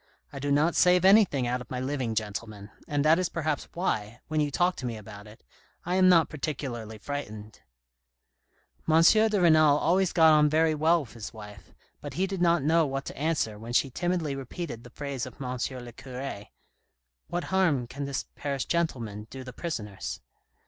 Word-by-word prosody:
I 140 Hz, -, -6 dB
do 145 Hz, +1 st, -2 dB
not 155 Hz, +4 st, +3 dB
save 180 Hz, 0 st, +4 dB
anything 190 Hz, -, +5 dB
out 125 Hz, +1 st, -1 dB
of -, -, -11 dB
my 125 Hz, -, -3 dB
living, 130 Hz, -3 st, -2 dB
gentlemen; 105 Hz, -1 st, -5 dB, 0.2 s
and 145 Hz, 0 st, 0 dB
that 160 Hz, +3 st, +5 dB
is 185 Hz, -, 0 dB
perhaps 155 Hz, -3 st, -2 dB
why, 115 Hz, -, -2 dB
when 155 Hz, -1 st, 0 dB
you 145 Hz, -, 0 dB
talk 175 Hz, +5 st, +1 dB
to 130 Hz, -, -6 dB
me 115 Hz, -2 st, -4 dB
about 105 Hz, 0 st, -11 dB
it, 105 Hz, +1 st, -16 dB, 0.4 s
I 175 Hz, -, -1 dB
am 185 Hz, 0 st, +5 dB
not 165 Hz, -3 st, +5 dB
particularly 130 Hz, -7 st, -5 dB
frightened." 110 Hz, -4 st, -7 dB, 1.3 s
M. 160 Hz, +1 st, +6 dB
de 215 Hz, +3 st, +5 dB
Renal 155 Hz, -4 st, +5 dB
always 180 Hz, +4 st, +2 dB
got 160 Hz, -2 st, +6 dB
on 150 Hz, -1 st, +5 dB
very 160 Hz, +1 st, +3 dB
well 160 Hz, +3 st, +3 dB
with 130 Hz, -, -11 dB
his 115 Hz, -2 st, -8 dB
wife, 105 Hz, -2 st, -12 dB, 0.3 s
but -, -, -7 dB
he 185 Hz, -, +1 dB
did 195 Hz, -2 st, -4 dB
not 170 Hz, -3 st, +3 dB
know 165 Hz, +3 st, +4 dB
what 135 Hz, 0 st, -4 dB
to -, -, -7 dB
answer 140 Hz, -9 st, -1 dB
when 115 Hz, +2 st, -7 dB
she 135 Hz, +2 st, +2 dB
timidly 175 Hz, -1 st, -1 dB
repeated 135 Hz, -2 st, -6 dB
the 120 Hz, -, -12 dB
phrase 140 Hz, -1 st, -5 dB
of 125 Hz, -, -13 dB
M. 125 Hz, -2 st, -4 dB, 0.3 s
le 120 Hz, -, -9 dB
cure, 125 Hz, -3 st, -7 dB, 0.4 s
" -, -, -53 dB
What 175 Hz, 0 st, -2 dB
harm 165 Hz, -10 st, +2 dB
can 140 Hz, +4 st, -6 dB
this 140 Hz, -2 st, -3 dB
Paris 140 Hz, -2 st, -3 dB
gentleman 115 Hz, -11 st, -2 dB
do 130 Hz, 0 st, -8 dB
the 125 Hz, -1 st, -9 dB
prisoners 105 Hz, -, -5 dB
140 Hz, 190 wpm, -27 LUFS, 120-165 Hz, 1.3 s, M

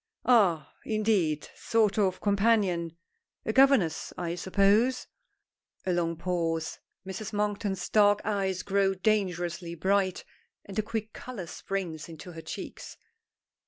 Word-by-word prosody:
"Ah! 195 Hz, -, +3 dB
indeed! 205 Hz, -9 st, +1 dB
Sort 220 Hz, -2 st, +1 dB
of 190 Hz, -3 st, +1 dB
companion 200 Hz, -5 st, +2 dB, 0.5 s
a 220 Hz, -, -1 dB
governess, 265 Hz, -, +4 dB
I 170 Hz, -1 st, -2 dB
suppose?" 200 Hz, +8 st, +2 dB, 0.8 s
A 185 Hz, -, +1 dB
long 170 Hz, -1 st, 0 dB
pause. 165 Hz, -2 st, -2 dB, 0.3 s
Mrs. 190 Hz, +3 st, -6 dB
Monkton's 205 Hz, -2 st, -1 dB
dark 205 Hz, -1 st, +4 dB
eyes 195 Hz, -3 st, -1 dB
grow 195 Hz, -1 st, +2 dB
dangerously 175 Hz, -4 st, -1 dB
bright, 190 Hz, +2 st, +1 dB, 0.4 s
and 200 Hz, +1 st, -4 dB
a -, -, +4 dB
quick 220 Hz, 0 st, -4 dB
color 240 Hz, -8 st, -7 dB
springs 170 Hz, -3 st, -5 dB
into 165 Hz, +2 st, -9 dB
her 165 Hz, -1 st, -8 dB
cheeks. 160 Hz, -, -8 dB
195 Hz, 120 wpm, -28 LUFS, 170-210 Hz, 0.8 s, governess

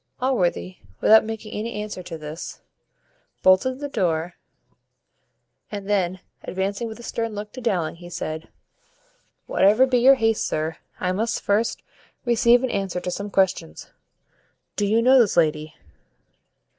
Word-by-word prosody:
Allworthy, 175 Hz, -, 0 dB, 0.2 s
without 220 Hz, +1 st, +6 dB
making 220 Hz, -1 st, -6 dB
any 225 Hz, +3 st, -4 dB
answer 210 Hz, -3 st, -5 dB
to 170 Hz, -2 st, -7 dB
this, 155 Hz, +1 st, -8 dB, 0.8 s
bolted 185 Hz, +8 st, +4 dB
the 285 Hz, +1 st, -4 dB
door, 175 Hz, -, -1 dB, 1.4 s
and 200 Hz, -2 st, -6 dB
then, 185 Hz, -3 st, 0 dB, 0.2 s
advancing 200 Hz, +4 st, -3 dB
with 220 Hz, +1 st, -8 dB
a -, -, -10 dB
stern 230 Hz, -2 st, -3 dB
look 210 Hz, 0 st, -6 dB
to 255 Hz, -, -8 dB
Dowling, 180 Hz, -9 st, -1 dB
he 175 Hz, 0 st, -11 dB
said, 160 Hz, -2 st, -5 dB, 1.0 s
"Whatever 210 Hz, +7 st, +4 dB
be 255 Hz, -2 st, +2 dB
your 265 Hz, +3 st, +7 dB
haste, 225 Hz, -3 st, +1 dB
sir, 155 Hz, +1 st, -2 dB, 0.2 s
I 180 Hz, -, 0 dB
must 225 Hz, +5 st, -1 dB
first 210 Hz, +3 st, 0 dB, 0.4 s
receive 240 Hz, +1 st, +4 dB
an 260 Hz, -, 0 dB
answer 195 Hz, -3 st, -2 dB
to 180 Hz, -, -4 dB
some 200 Hz, +3 st, -4 dB
questions. 190 Hz, -, -1 dB, 0.8 s
Do 205 Hz, -, 0 dB
you 225 Hz, +3 st, +2 dB
know 260 Hz, +2 st, +6 dB
this 215 Hz, -7 st, +3 dB
lady?" 155 Hz, -1 st, +1 dB
205 Hz, 145 wpm, -23 LUFS, 175-230 Hz, 1.4 s, your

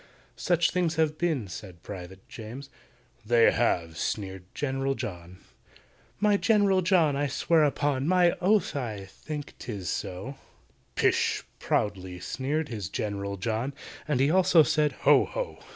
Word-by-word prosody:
Such 175 Hz, -2 st, +2 dB
things 175 Hz, -3 st, 0 dB
have 155 Hz, -1 st, +1 dB
been," 155 Hz, -, 0 dB
said 90 Hz, -2 st, -10 dB
PRIVATE 95 Hz, -1 st, -9 dB
JAMES. 125 Hz, +5 st, -9 dB, 0.5 s
"They 115 Hz, +1 st, +5 dB
have!" 85 Hz, -8 st, 0 dB
sneered 95 Hz, -3 st, -3 dB
GENERAL 135 Hz, -1 st, -1 dB
JOHN. 90 Hz, -4 st, -7 dB, 0.8 s
"My 205 Hz, 0 st, +3 dB
GENERAL 200 Hz, -4 st, +3 dB
JOHN, 170 Hz, -5 st, +3 dB
I 145 Hz, +1 st, 0 dB
swear 160 Hz, +4 st, +2 dB
upon 145 Hz, -1 st, 0 dB
My 180 Hz, -1 st, +4 dB
oath 200 Hz, -2 st, +2 dB
I 110 Hz, -8 st, -4 dB
think 145 Hz, +9 st, -7 dB
'tis 100 Hz, -7 st, -5 dB
so—" 125 Hz, +10 st, -5 dB, 0.6 s
"Pish!" -, -, +2 dB, 0.2 s
proudly 95 Hz, -3 st, -1 dB
sneered 145 Hz, +10 st, -2 dB
his 105 Hz, -8 st, -5 dB
GENERAL 100 Hz, +1 st, -3 dB
JOHN, 115 Hz, +7 st, -2 dB, 0.3 s
And 150 Hz, -4 st, +1 dB
he 140 Hz, +3 st, +3 dB
also 180 Hz, -2 st, +6 dB
said 150 Hz, -1 st, +1 dB
"Ho! -, -, +6 dB
ho!" -, -, -5 dB
135 Hz, 135 wpm, -27 LUFS, 100-160 Hz, 0.8 s, also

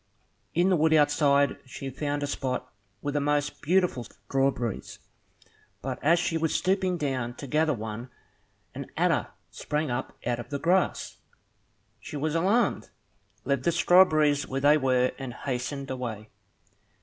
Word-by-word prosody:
In 175 Hz, +3 st, +3 dB
the -, -, +5 dB
wood 160 Hz, 0 st, +3 dB
outside, 145 Hz, -1 st, +3 dB
she 135 Hz, +1 st, -7 dB
found 145 Hz, +2 st, -2 dB
a -, -, +1 dB
spot 130 Hz, -3 st, -3 dB, 0.3 s
with 145 Hz, -, -2 dB
the 145 Hz, -, +1 dB
most 145 Hz, 0 st, 0 dB
beautiful 175 Hz, -6 st, +2 dB
strawberries; 135 Hz, -5 st, -2 dB, 0.9 s
but -, -, -4 dB
as 165 Hz, +4 st, +5 dB
she 165 Hz, -1 st, 0 dB
was 160 Hz, -1 st, 0 dB
stooping 185 Hz, -1 st, +1 dB
down 130 Hz, -5 st, -2 dB
to 140 Hz, -, -8 dB
gather 150 Hz, +2 st, +1 dB
one, 110 Hz, +2 st, -6 dB, 0.6 s
an -, -, -6 dB
adder -, -, +2 dB, 0.2 s
sprang 150 Hz, -2 st, -2 dB
up 120 Hz, +2 st, -4 dB
out 120 Hz, 0 st, 0 dB
of 120 Hz, -, -8 dB
the 145 Hz, -, -2 dB
grass. 180 Hz, +5 st, 0 dB, 0.8 s
She 150 Hz, -, -7 dB
was 150 Hz, +2 st, -1 dB
alarmed, 195 Hz, +9 st, +1 dB, 0.6 s
left 140 Hz, -1 st, +1 dB
the 170 Hz, -, +2 dB
strawberries 155 Hz, -5 st, +4 dB
where 135 Hz, +1 st, -3 dB
they 145 Hz, +2 st, +6 dB
were, 130 Hz, -3 st, +2 dB
and 130 Hz, -3 st, -6 dB
hastened 135 Hz, +1 st, -4 dB
away. 115 Hz, -4 st, -5 dB
145 Hz, 150 wpm, -27 LUFS, 130-160 Hz, 0.9 s, they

